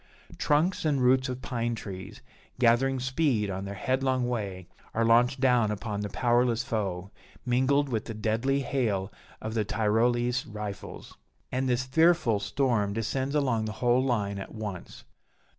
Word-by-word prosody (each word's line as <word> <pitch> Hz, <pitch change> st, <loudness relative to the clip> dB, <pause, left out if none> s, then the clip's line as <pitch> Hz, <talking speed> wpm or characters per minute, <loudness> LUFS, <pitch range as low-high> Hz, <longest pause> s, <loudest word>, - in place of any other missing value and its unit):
Trunks 155 Hz, +6 st, +2 dB
and 150 Hz, -4 st, +1 dB
roots 130 Hz, +1 st, +3 dB
of 125 Hz, 0 st, -5 dB
pine 120 Hz, -1 st, -2 dB
trees, 95 Hz, -4 st, -8 dB, 0.4 s
gathering 130 Hz, +2 st, +3 dB
speed 130 Hz, -5 st, 0 dB
on 95 Hz, +1 st, -4 dB
their 100 Hz, 0 st, -6 dB
headlong 130 Hz, +3 st, 0 dB
way, 100 Hz, -7 st, -3 dB, 0.3 s
are 115 Hz, +1 st, +2 dB
launched 120 Hz, +4 st, +4 dB
down 125 Hz, -4 st, +3 dB
upon 105 Hz, 0 st, -3 dB
the 105 Hz, -, -3 dB
powerless 120 Hz, +2 st, +2 dB
foe, 100 Hz, -4 st, -3 dB, 0.3 s
mingled 130 Hz, +3 st, +2 dB
with 115 Hz, -5 st, -2 dB
the 115 Hz, -, -6 dB
deadly 115 Hz, +6 st, 0 dB
hail 110 Hz, -8 st, -1 dB, 0.3 s
of 110 Hz, 0 st, -4 dB
the 110 Hz, -2 st, +1 dB
Tyrolese 120 Hz, +4 st, +1 dB
rifles. 105 Hz, -1 st, -7 dB, 0.3 s
And 130 Hz, +1 st, 0 dB
this 125 Hz, +1 st, +1 dB
fearful 160 Hz, -5 st, +3 dB
storm 105 Hz, -1 st, 0 dB
descends 130 Hz, +6 st, -2 dB
along 130 Hz, -7 st, +1 dB
the 110 Hz, -, -4 dB
whole 125 Hz, +1 st, +3 dB
line 105 Hz, -6 st, -1 dB
at 95 Hz, -, -8 dB
once. 105 Hz, -5 st, -7 dB
120 Hz, 150 wpm, -28 LUFS, 105-130 Hz, 0.4 s, launched